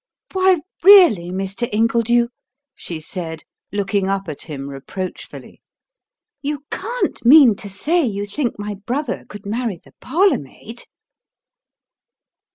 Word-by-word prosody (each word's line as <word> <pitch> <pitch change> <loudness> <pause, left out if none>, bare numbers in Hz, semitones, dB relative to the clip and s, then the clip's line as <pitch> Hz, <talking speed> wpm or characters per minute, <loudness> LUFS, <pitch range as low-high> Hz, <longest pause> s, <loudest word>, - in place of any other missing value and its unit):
"Why, 375 -3 +3 0.2
really, 345 - +7
Mr. 195 +5 -3
Ingledew," 235 +2 +2 0.4
she 170 -9 -7
said, 160 0 -6 0.3
looking 200 -1 -1
up 195 -1 -2
at 150 -3 -6
him 140 -3 -7
reproachfully, 140 +7 -8 0.8
"you 290 0 -4
can't 475 +6 -3
mean 255 -3 +7
to 200 - -8
say 315 - +1
you 205 -5 -2
think 240 +4 -3
my 205 0 -4
brother 245 +7 -4
could 205 0 -10
marry 220 -1 -2
the - - -22
parlour 370 +9 +2
maid!" 220 - -11
215 Hz, 120 wpm, -20 LUFS, 190-280 Hz, 0.8 s, really